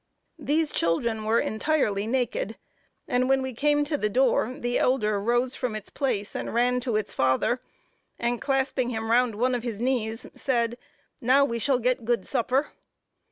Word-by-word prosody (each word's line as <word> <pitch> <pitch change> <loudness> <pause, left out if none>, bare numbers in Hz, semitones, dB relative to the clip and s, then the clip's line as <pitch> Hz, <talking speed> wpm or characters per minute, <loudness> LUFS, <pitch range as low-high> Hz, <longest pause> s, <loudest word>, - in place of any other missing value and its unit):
These 310 +1 +1
children 215 +7 0
were 225 +2 +3
entirely 220 -4 0
naked, 240 -3 -1 0.5
and 250 +1 +1
when 270 0 +3
we 260 -1 -4
came 295 +4 +2
to 295 0 -2
the 210 - 0
door, 250 +1 +2
the 240 0 -1
elder 215 -5 +2
rose 240 +4 +1
from 250 -5 -3
its 215 -1 -7
place 225 -7 -2
and - - -3
ran 250 +1 +3
to 245 -3 -2
its 215 -1 -1
father, 130 - +1 0.6
and 240 0 -1
clasping 265 -2 0
him 225 -1 -3
round 240 -2 +3
one 250 +4 +1
of 245 - -1
his 230 -3 -4
knees, 235 -2 -1
said, 240 -2 -1 0.4
"Now 265 +3 +5
we 235 -4 -3
shall 265 +3 +2
get 250 0 0
good 230 -4 0
supper." 260 +2 0
245 Hz, 170 wpm, -26 LUFS, 220-260 Hz, 0.6 s, Now